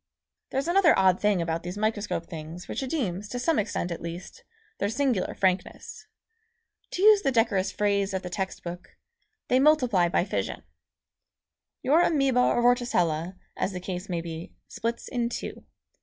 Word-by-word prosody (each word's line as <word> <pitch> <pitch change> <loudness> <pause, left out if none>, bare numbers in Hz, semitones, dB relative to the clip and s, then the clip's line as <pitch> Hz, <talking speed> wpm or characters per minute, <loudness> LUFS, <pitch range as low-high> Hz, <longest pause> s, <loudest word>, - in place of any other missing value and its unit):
There's 270 +4 -2
another 350 -2 +5
odd 190 -1 +4
thing 205 -4 +2
about 165 0 -2
these 180 +3 -6
microscope 210 -5 -1
things 165 +2 -8
which - - -3
redeems, 210 - -2
to 245 - -4
some 295 +4 +1
extent 195 -4 -2
at 170 - -5
least, 170 +2 -8 0.4
their 205 - 0
singular 245 -5 0
frankness. 185 -1 -2 0.9
To 365 - -1
use 425 -1 +7
the 270 - +1
decorous 225 -6 +2
phrase 200 -1 +1
of 190 -1 -3
the 180 - -5
text 190 +1 -4
book, 175 +2 -8 0.5
"They 255 - +3
multiply 250 - +4
by 175 - +1
fission." - - -3 1.2
Your 305 +6 +4
amoeba 275 -7 +2
or 240 -1 +3
vorticella, 180 -9 +1 0.2
as 195 - -2
the 180 - -4
case 180 +1 -5
may 170 -2 -1
be, 165 0 -8
splits 230 +1 -4
in 240 -1 -1
two. - - -6
205 Hz, 160 wpm, -27 LUFS, 180-250 Hz, 1.2 s, use